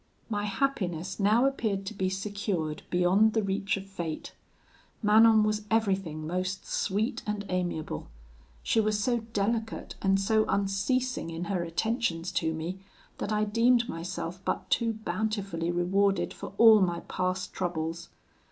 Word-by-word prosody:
"My 205 -1 -1
happiness 190 - -1
now 215 +5 +4
appeared 215 -8 0
to 210 - -5
be 190 -2 -1
secured 190 -5 -3
beyond 185 +5 +4
the 220 - +1
reach 195 +1 0
of 195 - -7
fate. 170 -5 -5 0.7
Manon 220 +1 +6
was 215 0 -1
everything 195 -8 0
most 185 +3 -2
sweet 215 +7 -1
and 210 -1 -2
amiable. 175 -4 -2 0.6
She - - +2
was 215 -1 +1
so 240 +3 +1
delicate 225 0 -2
and 195 0 +3
so 215 +2 +2
unceasing 200 +3 0
in 165 +1 -4
her 185 -1 -1
attentions 175 0 -1
to 165 -2 0
me, 165 +4 -4 0.4
that 205 - -3
I 210 0 +2
deemed 235 +3 +3
myself 180 0 -5
but - - -3
too 230 -1 +2
bountifully 200 -4 -2
rewarded 195 +3 +1
for - - -8
all 225 -2 +8
my 175 -2 +1
past 185 0 -2
troubles. 165 -2 -3
195 Hz, 145 wpm, -29 LUFS, 180-220 Hz, 0.7 s, all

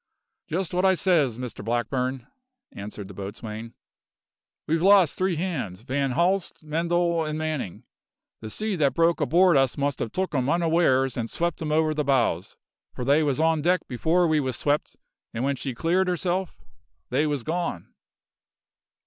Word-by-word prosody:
"Just 180 +1 -3
what 180 +1 +1
I 190 -1 +5
says, 155 - +2
Mr 125 -5 -6
Blackburn," 125 +2 -1 0.5
answered 100 0 -8
the 100 - -10
boatswain. 105 +4 -7 0.9
"We've 165 +1 0
lost 195 -4 +5
three 185 -1 0
hands 150 - -3
Van 135 +1 -1
Haalst, 180 +3 0
Mendal, 170 +2 0
and 155 0 -3
Manning. 155 - -3 0.6
The 110 - -7
sea 215 - -2
that 145 -4 +2
broke 165 0 +2
aboard 170 +2 +4
us 135 -2 +2
must 140 -1 -1
have 115 - -3
took 190 -3 -2
'em 130 -1 0
unawares 160 -6 +2
and 115 -1 -2
swept 170 -1 -2
'em 155 -1 -2
over 155 0 +2
the 150 0 -1
bows, 135 -4 0 0.4
for 125 - -4
they 145 +4 +4
was 145 -2 0
on 160 -1 +2
deck 180 +2 +2
before 165 +8 +2
we 155 -1 +2
was 130 -3 -1
swept, 145 +1 -1 0.4
and 115 - -2
when 140 +1 +1
she 130 -1 -5
cleared 180 +7 +1
herself 180 +1 -1 0.5
they 145 +5 +2
was 145 -5 -2
gone!" 165 - -3
150 Hz, 165 wpm, -25 LUFS, 130-170 Hz, 0.9 s, I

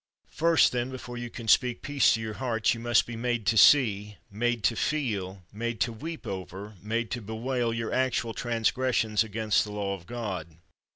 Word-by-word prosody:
First, 165 -1 +4
then, 125 0 -1
before 125 -2 -8
you 120 0 -5
can 115 -1 -9
speak 125 +2 +3
peace 145 -1 +3
to 115 - -4
your 110 -1 -4
hearts, 115 -3 0
you 115 - -6
must 120 0 +3
be 120 - -7
made 120 -1 -2
to 115 - +2
see, 105 -3 +5
made 120 +2 -1
to 115 - +2
feel, 100 -11 -2
made 115 +1 -3
to 115 +1 +1
weep 160 +7 -7
over, 95 +1 -6
made 115 +2 -2
to 120 - -3
bewail, 115 +3 -2
your 115 0 -3
actual 125 -3 0
transgressions 115 -1 +1
against 110 -1 +1
the 105 - -7
law 100 -1 -2
of 90 -3 -9
God. 95 -10 -5
115 Hz, 185 wpm, -28 LUFS, 105-120 Hz, -, see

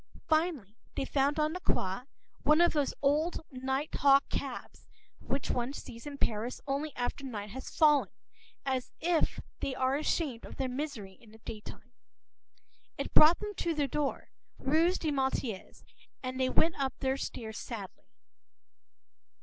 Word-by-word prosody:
Finally, 310 - +1 0.2
they 270 - -1
found 280 +2 +2
on 305 +1 +2
the 365 - -3
Quai 190 - -1 0.4
one 305 +2 +5
of 345 0 +5
those 290 -3 +2
old 300 +5 +2
night 265 +3 -2
hawk 275 0 +5
cabs - - -5 0.3
which 275 - -2
one 245 +2 -1
sees 230 -1 -8
in 285 -1 -6
Paris 230 0 -1
only 285 +2 -1
after 245 +3 -2
night 210 -6 -5
has 260 +3 -6
fallen, 295 -4 +5 0.6
as 260 -2 -1
though 340 -1 +3 0.4
they 265 - -2
are 260 +1 +2
ashamed 295 -5 -1
of - - -9
their 265 - -1
misery 250 -8 -4
in 230 - -17
the 220 - -14
daytime. 215 +2 -8 1.1
It - - -4
brought 315 +3 +8
them 420 -1 -3
to 335 -2 0
their 295 -1 +2
door, 280 +1 -2 0.3
rue 320 +6 +3
des 320 -4 -1
Martyrs; 265 -7 -2 0.4
and 255 0 -3
they 260 0 +3
went 320 +3 +3
up 270 -1 -1
their 265 -1 0
own 265 - 0
stairs 220 -5 -5
sadly. 205 -6 -7
275 Hz, 160 wpm, -31 LUFS, 245-300 Hz, 1.1 s, brought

